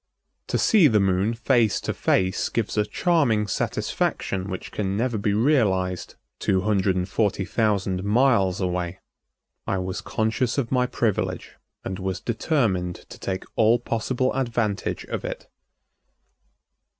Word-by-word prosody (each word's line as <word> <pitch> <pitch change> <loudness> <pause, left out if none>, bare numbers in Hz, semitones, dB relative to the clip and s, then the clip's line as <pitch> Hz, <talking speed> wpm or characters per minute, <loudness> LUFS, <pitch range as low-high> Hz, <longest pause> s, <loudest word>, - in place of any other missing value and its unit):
To - - 0
see 200 -8 +5
the 110 -5 +3
Moon 95 +3 +1
face 115 -3 +2
to - - -2
face 95 0 +1
gives 115 -3 -2
a 105 -1 +1
charming 140 -13 +2
satisfaction 95 -1 -2
which 95 - -6
can 100 -1 -2
never 120 +1 0
be 100 -1 0
realized 100 - +1 0.2
two 95 -1 +1
hundred 100 -2 +1
and 90 0 -1
forty 100 0 0
thousand 100 -3 0
miles 105 -4 +3
away. 90 -1 -2 0.7
I 95 - 0
was 95 0 -3
conscious 115 +3 -1
of 125 -5 -1
my 125 -1 +2
privilege 115 -5 -1 0.3
and 95 0 -4
was 95 -1 -3
determined 110 - 0
to - - -11
take 95 -1 -3
all 115 +2 +4
possible 120 +2 -1
advantage 120 -6 -1
of - - -4
it. - - -6
105 Hz, 140 wpm, -24 LUFS, 95-120 Hz, 0.7 s, see